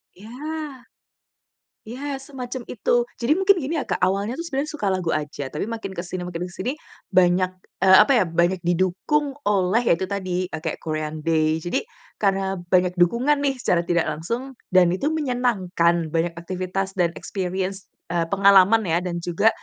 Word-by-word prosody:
Ya. 205 +4 -13 1.6
Ya, 270 +3 -5
semacam 260 -2 -6
itu. 240 +1 +1
Jadi 245 +5 +2
mungkin 395 +1 +5
gini 310 0 -3
ya - - -1
Kak - - 0
awalnya 200 +6 +1
tuh 335 - -4
sebenernya 295 -1 -2
suka 210 -11 -1
lagu 185 -3 -2
aja, 145 -2 -4
tapi 150 - -3
makin 220 -4 -6
ke 175 - -4
sini 180 0 -5
makin 175 -1 -4
ke 180 - -9
sini 215 +9 -2 0.4
banyak, 185 -1 +3 0.3
eee, 190 0 +8
apa 245 - 0
ya, 235 - +4
banyak 175 +2 +1
didukung 185 - 0
oleh 200 +2 +2
ya 230 -8 +3
itu 190 - -2
tadi, 185 -2 -2
kayak 160 0 -3
Korean 155 -1 -3
Day. 160 -1 +2
Jadi, 175 +2 -2 0.4
karena 195 -2 0
banyak 180 0 +2
dukungan 240 +11 +3
nih 275 -1 +1
secara 175 -7 +1
tidak 170 -1 +2
langsung, 235 - -4 0.2
dan 180 -2 +5
itu 235 +11 -1
menyenangkan 195 - 0
banyak 165 +1 0
aktivitas 185 +2 -3
dan 175 -1 +4
experience, 190 0 -4 0.2
eee, 170 -1 0
pengalaman 200 +3 +5
ya 165 0 +1
dan 175 -1 -3
juga, 190 +6 +3
190 Hz, 170 wpm, -23 LUFS, 175-235 Hz, 1.6 s, eee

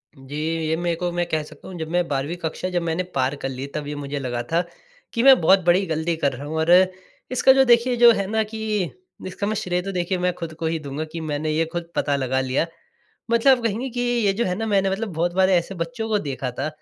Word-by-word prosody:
जी, 135 +1 -10 0.3
ये 160 - +1
मेरे 175 0 -1
को 175 +1 -2
मैं 175 0 -1
कह 155 -2 0
सकता 155 -1 -14
हूँ 185 - -8
जब 160 -1 -4
मैं 175 0 +1
12वीं 140 +4 -2
कक्षा 165 +2 -3
जब 175 -1 -1
मैंने 170 +2 -1
पार 130 +1 +1
कर 135 -1 -4
ली 130 +1 -5
तब 150 -1 -3
ये 150 - -4
मुझे 145 0 -4
लगा 120 -3 -3
था 170 +1 +3 0.5
कि 230 0 +1
मैं 270 -1 +8
बहुत 190 +4 +6
बड़ी 180 +3 +4
गलती 165 0 -1
कर 145 -3 0
रहा 135 +3 -7
हूँ। 160 +2 -4
और 160 +2 +2 0.6
इसका 255 +1 +5
जो 270 0 +5
देखिए 240 0 +4
जो 240 0 +8
है 200 -3 0
ना 220 0 +2
कि 215 -3 -2 0.4
इसका 195 +2 -4
मैं 215 - -1
श्रेय 180 -3 -1
तो 195 - -5
देखिए 180 0 -1
मैं 180 0 0
खुद 165 -2 -7
को 160 +1 -5
ही 160 0 0
दूँगा 145 +1 -5
कि 165 - -5
मैंने 155 0 -2
ये 160 +2 +1
खुद 170 -1 -3
पता 145 - +1
लगा 130 -1 0
लिया। 130 +4 0 0.7
मतलब 245 +1 +4
कहेंगे 230 +4 -1
कि 245 +1 -4
ये 240 -4 +2
जो 230 +5 -1
है 180 - 0
ना 225 - -2
मैंने 195 -2 +2
मतलब 210 +4 -2
बहुत 170 +2 0
बार 190 0 +3
ऐसे 180 +1 +1
बच्चों 220 +6 -4
को 215 -1 +2
देखा 135 -5 -4
था 135 +5 -3
175 Hz, 255 wpm, -23 LUFS, 155-205 Hz, 0.7 s, मैं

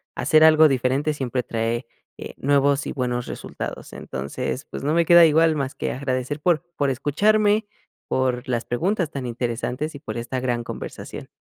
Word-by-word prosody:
hacer 155 0 +4
algo 155 0 +7
diferente 135 +2 +1
siempre 130 -3 -2
trae, 115 +1 -2 0.3
eh, - - -8
nuevos 140 0 +2
y - - -3
buenos 125 -2 -2
resultados. - - -7
Entonces, 70 - -5
pues, - - -7
no 150 +2 +1
me 170 0 +3
queda 170 0 +8
igual 160 0 +4
más 140 -1 -3
que - - -3
agradecer 130 +2 -3
por 170 0 +2
por 140 -3 +1
escucharme, 205 - +2 0.4
por 130 0 -1
las 120 -2 -1
preguntas 175 - -1
tan 140 -4 -5
interesantes 125 +5 -3
y 140 - -8
por 110 -6 -6
esta 120 +2 -3
gran 120 -2 -1
conversación. - - -8
135 Hz, 170 wpm, -23 LUFS, 125-155 Hz, 0.4 s, queda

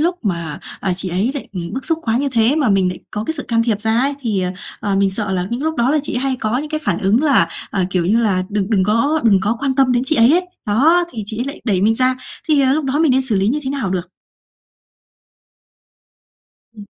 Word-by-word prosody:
lúc 345 -3 -1
mà, 170 -6 -3 0.2
à, 190 - 0
chị 185 +1 +1
ấy 190 +8 0
lại, 280 - -6
ừm, 170 -3 -5
bức 265 - -4
xúc 325 0 +3
quá 225 0 0
như 280 0 0
thế 235 +5 +3
mà 280 -8 +2
mình 195 -2 +2
lại 180 - -5
có 210 +1 -4
cái 320 - -2
sự 290 - -3
can 230 -1 +2
thiệp 220 -3 -1
ra 220 +1 +1
ấy 280 +2 0
thì, 215 -7 -1
ờ, 180 - -1 0.3
ờ, 200 -1 0
mình 195 0 +2
sợ 200 0 -3
là 180 -1 -1
những 240 +4 -3
lúc 320 0 -2
đó 245 +1 +2
là 305 - +2
chị 270 - -3
hay 260 0 -1
có 225 +2 -1
những 300 +1 -5
cái 310 -1 -2
phản 170 - 0
ứng 210 +8 +2
là, 275 - +4 0.2
ờ, 190 -2 0
kiểu 180 -3 0
như 220 +5 +3
là, 195 -5 +1
đừng 205 0 -2
đừng 200 -4 +3
có 255 +10 +1
đừng 200 -4 +4
có 210 +4 0
quan 275 -2 0
tâm 265 -2 +3
đến 245 0 +1
chị 315 - +2
ấy 230 +4 +5
ấy, 360 +2 +2 0.2
đó, 315 +12 +3
thì 220 -3 -5
chị 215 +1 -4
ấy 245 - -1
lại 275 - -6
đẩy 195 -6 +1
mình 220 +3 +3
ra, 255 +2 +1 0.3
thì, 295 -2 +4
ờ, 265 0 +3
lúc 305 0 0
đó 270 +2 -1
mình 315 -5 +3
nên 265 +1 +2
xử 245 -5 -1
lý 195 +2 +1
như 290 +5 0
thế 265 - -3
nào 270 -9 -2
được? 180 -2 -3 2.7
Ừm. 205 - -10
230 Hz, 270 wpm, -18 LUFS, 195-275 Hz, 2.7 s, ấy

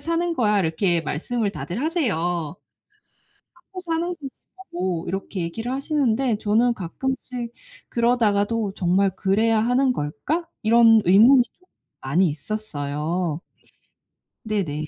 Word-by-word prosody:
사는 335 +1 -1
거야." 210 -6 +2
이렇게 170 +1 +1
말씀을 205 +9 -2
다들 185 +8 -5
하세요. 315 - 0 1.4
"하고 360 +2 -12
사는 335 0 -2
거지."라고 190 - -6
이렇게 195 0 -4
얘기를 225 +9 -4
하시는데 265 -4 0
저는 225 +4 +2
가끔씩 240 +5 -4 0.4
그러다가도 230 -3 +1
'정말 190 +2 +2
그래야 220 +3 +2
하는 250 +3 +2
걸까?' 155 - -3 0.2
이런 225 0 +6
의문이 235 +8 +7
좀 365 +9 -27 0.4
많이 170 +8 +2
있었어요. 155 -1 -3 1.0
네네. 160 -9 -2
220 Hz, 265 characters per minute, -23 LUFS, 180-255 Hz, 1.4 s, 의문이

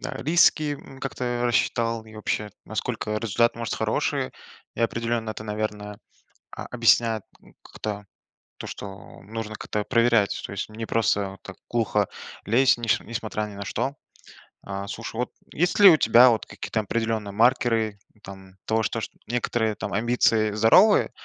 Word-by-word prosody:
да, 150 - -5
риски, 155 +1 +3
м, 135 -1 -13
как-то 120 -2 -3
рассчитал 115 -1 0
и 110 0 -15
вообще, 105 0 -3
насколько 110 0 -3
результат 115 +2 +1
может 115 -3 -3
хороший. - - -1 0.4
И - - -6
определенно 115 -1 -1
это, 110 0 -7
наверное, 105 -1 -4 0.5
а, - - -7
объясняет 115 -3 +3 0.2
н - - -19
как-то 105 -1 -6 0.5
то, - - -7
что 95 -1 -9
нужно 110 +1 -6
как-то 105 0 -3
проверять, 115 -4 +2
то - - -6
есть 100 - -4
не 110 +1 -6
просто 100 -3 0
так 100 - -10
глухо 105 -4 +1 0.4
лезть, 130 +6 +4
неш 115 -2 +1
несмотря 110 -2 -4
ни 105 - -10
на 100 0 -6
что. 135 +7 -2 0.7
А, 100 0 -5
слушай, 115 +2 -6
вот, 125 +2 -2 0.2
есть 175 +6 0
ли 200 -1 +10
у 160 - +6
тебя, 125 -3 +7
вот, 115 -2 0
какие-то 110 - -4
определенные 110 -1 -2
маркеры, 115 -2 +2 0.2
там, 95 -1 -11
того, 110 0 +1
то, 115 - -2
что - - -8
некоторые 115 -2 -1
там - - -5
амбиции 110 0 +2
здоровые, 115 - +5
115 Hz, 155 wpm, -25 LUFS, 105-120 Hz, 0.7 s, ли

